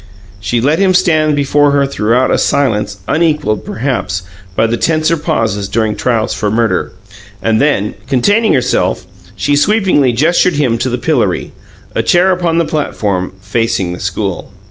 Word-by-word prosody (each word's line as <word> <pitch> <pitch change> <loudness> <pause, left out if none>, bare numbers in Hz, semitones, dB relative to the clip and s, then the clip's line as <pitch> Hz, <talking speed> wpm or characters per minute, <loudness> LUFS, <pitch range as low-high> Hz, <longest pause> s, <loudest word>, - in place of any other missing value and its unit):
She 105 +4 -1
let 150 +7 +1
him 190 -2 +3
stand 155 -4 +2
before 145 +1 +2
her 140 -1 +3
throughout 125 -1 +1
a - - +2
silence, 105 -7 0 0.2
equalled, 150 -10 0
perhaps, 110 -7 -3 0.3
by 115 - +2
the 115 +1 0
tenser 155 +4 +1
pauses 115 - -1
during 110 -1 0
trials 115 -2 0
for 105 - -2
murder, 115 +1 0 0.5
and 110 +3 +1
then, 135 -8 +1
containing 205 - +2
herself, 95 -8 0 0.3
she 100 +10 0
sweepingly 180 - +2
gestured 165 +7 +2
him 125 -6 0
to 130 - -1
the 125 - -2
pillory 120 - -1 0.4
a - - 0
chair 180 +2 +3
upon 175 -2 0
the 170 - +2
platform, 100 - -2
facing 100 -3 -1
the 90 - -7
school. 95 0 -4
125 Hz, 155 wpm, -13 LUFS, 105-155 Hz, 0.5 s, him